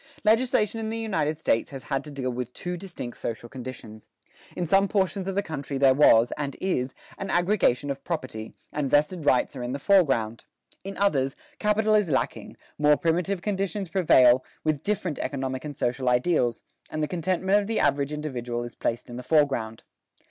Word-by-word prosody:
Legislation 225 -1 +2
in 220 -1 -3
the 225 - -3
United 160 -9 -1
States 115 -7 +1
has 135 -2 -8
had 135 -2 -2
to 150 - -9
deal 135 -3 -3
with 125 0 -4
two 180 0 -4
distinct 175 -10 -8
social 115 0 -4
conditions. 120 -4 -9 0.5
In 175 - -1
some 195 +4 +4
portions 190 -2 0
of 195 - -2
the 200 - +1
country 145 -5 -4
there 135 -1 +5
was, 120 -4 +5
and 140 -2 -3
is, 135 -9 -1 0.2
an 195 - -4
aggregation 175 - +2
of 135 0 -6
property, 130 -10 -5 0.2
and 145 -2 -1
vested 150 +3 +2
rights 130 +2 +3
are 130 - -5
in 120 +1 -3
the - - -2
foreground: 135 - +2 0.4
in 195 +1 -6
others, 135 -10 +1 0.2
capital 215 +1 +2
is 210 -5 +3
lacking, 130 -3 -2 0.2
more 150 0 +5
primitive 175 +3 0
conditions 195 -2 -2
prevail, 130 -9 +5 0.2
with 155 -3 0
different 185 -5 -2
economic 130 -2 -3
and 150 -2 -6
social 125 0 0
ideals, 125 -2 +1 0.3
and 155 0 -2
the - - 0
contentment 185 +5 +1
of 200 - -6
the 225 - 0
average 140 0 +1
individual 125 -6 -3
is 120 -1 -7
placed 115 - -3
in 120 - -8
the - - -5
foreground. 125 -6 +1
150 Hz, 185 wpm, -26 LUFS, 130-190 Hz, 0.5 s, there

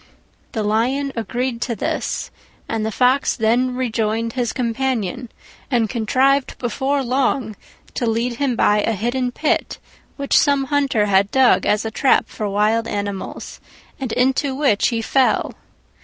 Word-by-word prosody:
The 220 - -1
Lion 255 +7 0
agreed 240 +2 -3
to 240 -2 -2
this, - - -3 0.4
and 225 -1 -2
the 220 - -2
Fox 255 +5 +2
then 245 +3 +1
rejoined 230 -2 -1
his 245 -3 -1
companion 245 -2 -2 0.4
and 235 -5 +1
contrived 260 +4 +1
before 270 +3 -1
long 255 -3 0 0.4
to 240 - -2
lead 230 +2 -1
him 270 -3 0
by 210 -1 +3
a 225 - 0
hidden 245 +4 -1
pit, 305 +5 -1 0.4
which 280 -1 0
some 280 -2 +4
hunter 275 -6 +1
had 195 0 +3
dug 265 +1 +3
as 210 +1 +1
a 220 - -3
trap 265 +4 +2
for 210 -1 -4
wild 215 +3 +1
animals, 200 -2 -5 0.4
and 260 -4 -4
into 265 +2 +1
which 270 -8 +2
he 230 -2 -1
fell. 265 +2 +1
240 Hz, 145 wpm, -20 LUFS, 220-265 Hz, 0.4 s, some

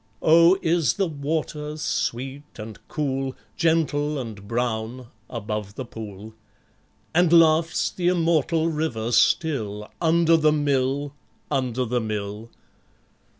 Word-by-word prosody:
Oh, 170 +3 +6
is 160 -6 +2
the 195 - +1
water 150 -1 -3
sweet 135 -2 -2 0.2
and 110 -1 -8
cool, 135 -3 -2 0.2
Gentle 150 -3 +1
and 110 -6 -7
brown, 120 +1 -3 0.2
above 105 -3 -5
the 130 - -5
pool? 110 -2 -9 0.8
And 175 0 +4
laughs 165 0 +4
the 175 -1 -2
immortal 165 -2 +2
river 150 -8 -2
still 110 -8 +1
Under 165 0 +4
the 155 -1 +4
mill, 140 -1 0 0.4
under 130 -2 0
the 125 +1 -1
mill? 105 0 -4
140 Hz, 110 wpm, -24 LUFS, 115-160 Hz, 0.8 s, Oh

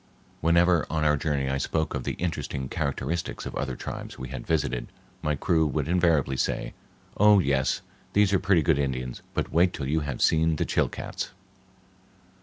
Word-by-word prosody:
Whenever 85 0 +4
on 80 -1 0
our 75 0 +4
journey 70 -2 -1
I 70 +1 0
spoke 80 +4 -1
of - - -3
the - - -1
interesting 75 -6 -3
characteristics 70 +4 -2
of - - -5
other 65 - -2
tribes - - -7
we 65 0 -6
had 65 -2 -7
visited, 70 -6 0 0.3
my 75 -1 0
crew 80 +1 +2
would 70 - -1
invariably 85 -6 +2
say, - - -1 0.4
"Oh, 105 0 +7
yes, 70 -7 +1 0.3
these 100 -1 +4
are 95 - +4
pretty 95 -4 +3
good 75 0 +3
Indians, 65 -3 -2
but - - -1
wait 90 +2 +4
till 70 - -4
you 80 +3 +1
have 70 -5 -4
seen 80 0 +3
the - - -1
Chilcats." - - -2
75 Hz, 175 wpm, -26 LUFS, 65-85 Hz, 0.4 s, Oh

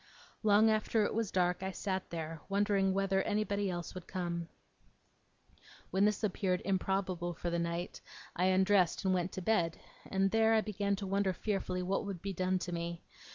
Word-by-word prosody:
Long 215 +1 +5
after 215 0 +2
it - - -1
was 225 -2 0
dark 180 -1 +1
I 190 - -2
sat 190 0 -3
there, 160 -1 -5
wondering 200 -1 +2
whether 195 0 +1
anybody 205 -1 0
else 175 -2 -4
would 185 -2 -8
come. 170 -3 -3 1.4
When 190 +2 +3
this 210 +1 +1
appeared 185 -2 +1
improbable 185 -2 -1
for 175 +1 -3
that 170 - 0
night, 170 +1 -3 0.3
I 180 - +2
undressed, 190 -1 +3
and 190 - +3
went 180 0 0
to 190 - -5
bed; 175 -6 +1 0.3
and, 195 0 +2
there, 225 0 +4
I 220 - +4
began 200 -1 -1
to 195 0 -5
wonder 195 0 +1
fearfully 185 -2 -2
what 190 +2 0
would 195 -3 -4
be 195 0 -2
done 185 +1 +1
to 175 - -5
me. 170 0 -4
190 Hz, 180 wpm, -33 LUFS, 180-200 Hz, 1.4 s, Long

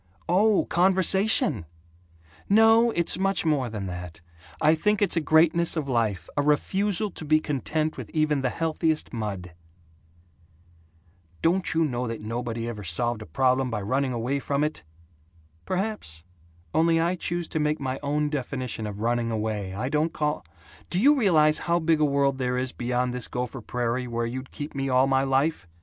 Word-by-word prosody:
"Oh, 200 +4 +3
conversation! 185 - +3 0.8
No, 225 +3 +6
it's 170 -4 0
much 195 -2 0
more 140 -6 +1
than 105 -3 -5
that. 90 -3 -7 0.4
I 155 - +4
think 210 +6 +1
it's 205 - +2
a 165 - +2
greatness 165 +2 +3
of 150 -3 -2
life 110 - -1
a 145 - +2
refusal 195 +8 0
to 160 - -8
be 155 +1 +3
content 155 +2 -2
with - - -7
even 155 -3 +1
the 130 - 0
healthiest 160 +1 -1
mud." 100 -6 -5 1.9
"Don't 180 +3 +2
you 165 0 +3
know 125 -3 -2
that 115 -1 -4
nobody 115 +1 -4
ever 110 -3 -6
solved 110 +7 -1
a 110 - -9
problem 130 +8 +1
by 110 -3 -3
running 130 +5 0
away 125 +4 -1
from 140 +1 -1
it?" 155 +1 -2 0.9
"Perhaps. 185 - -3 0.5
Only 165 0 +3
I 170 +2 +1
choose 175 -1 -3
to 160 - -2
make 150 0 0
my 130 -1 -3
own 150 +1 -1
definition 130 -5 -3
of 105 0 -7
'running 120 0 0
away' 105 -4 -3
I 115 +5 -2
don't 155 +3 0
call 150 - -1 0.5
Do 180 - 0
you 280 +8 +6
realize 155 - +3
how 170 - +4
big 165 -1 +2
a - - +5
world 140 -1 +1
there 125 -1 -1
is 130 0 -1
beyond 125 0 -1
this 125 -2 -3
Gopher 125 +1 -4
Prairie 125 +2 -2
where 115 0 -2
you'd 130 +3 -5
keep 145 +1 -7
me 135 -1 -2
all 130 +1 +4
my 135 0 +2
life? 135 - 0
140 Hz, 170 wpm, -25 LUFS, 120-165 Hz, 1.9 s, No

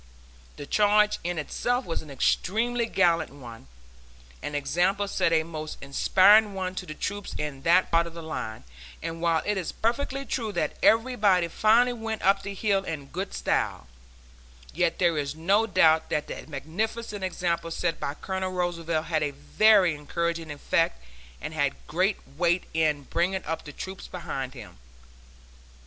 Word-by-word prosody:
The 145 - -7
charge 210 +4 +3
in 175 0 -2
itself 245 - -1
was 165 - -3
an 155 - -13
extremely 230 - 0
gallant 170 -6 +2
one, 120 - -12 0.7
and 145 - -5
the - - +2
example 180 +8 +1
set 170 - +1
a 160 -1 +3
most 155 -1 -6
inspiring 200 +9 +5
one 185 -1 -3
to 185 -1 -6
the 155 - -6
troops 205 +3 -4
in 150 -3 -4
that 175 +5 +3
part 170 0 +3
of 170 - -10
the 165 - -7
line, 110 - -5 0.4
and 165 0 -5
while 165 -1 +2
it 210 -1 0
is 180 - -4
perfectly 270 +4 -1
true 225 -6 -2
that - - -1
everybody 215 -7 +3
finally 230 +7 +4
went 225 -2 -5
up 195 +1 +4
the 200 0 -6
hill 195 -1 +1
in 150 -6 -6
good 190 +3 -4
style, - - -1 0.9
yet 165 - +1
there 170 -4 +2
is 140 0 -3
no 200 +8 +2
doubt 160 -5 +4
that 150 - -1
the - - -8
magnificent 205 - -4
example 175 -2 -1
set 165 0 -2
by 140 - -3
Colonel 190 +2 -3
Roosevelt 170 -3 -1
had 160 -2 0
a 150 - +1
very 180 +6 +4
encouraging 165 +2 -3
effect 145 - 0 0.4
and 155 - -6
had 145 -3 0
great 185 +5 +1 0.2
weight 175 +1 +2
in 155 -3 +1
bringing 185 +6 -1
up 165 +1 -4
the 150 - -8
troops 190 +6 -7
behind 135 -7 -5
him. - - -11
175 Hz, 165 wpm, -27 LUFS, 155-200 Hz, 0.9 s, inspiring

